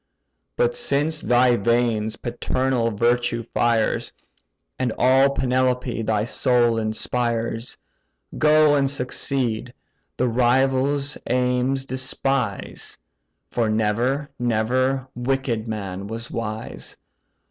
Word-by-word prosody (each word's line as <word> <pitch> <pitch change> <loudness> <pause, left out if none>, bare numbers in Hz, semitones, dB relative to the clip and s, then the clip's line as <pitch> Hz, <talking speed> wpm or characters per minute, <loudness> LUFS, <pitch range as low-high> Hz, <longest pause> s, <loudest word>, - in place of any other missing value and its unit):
But 485 0 +1
since 155 - +1
thy 125 0 +4
veins 115 -1 +1
paternal 120 0 -1
virtue 120 +2 0
fires, 115 -1 0 0.7
And 130 -2 0
all 135 +2 +5
Penelope 125 -2 0
thy 110 -1 0
soul 120 -1 +2
inspires, 115 +1 -2 0.6
Go, 155 0 +5
and 140 -2 +2
succeed: 125 -3 -1 0.4
the 125 - +1
rivals' 130 +4 +1
aims 125 +2 0
despise; 130 -4 -3 0.5
For 115 -2 0
never, 115 +7 0
never 125 +3 +1
wicked 120 -2 -1
man 100 -3 -5
was 115 +2 -6
wise. 110 -1 -6
125 Hz, 95 wpm, -23 LUFS, 115-135 Hz, 0.7 s, all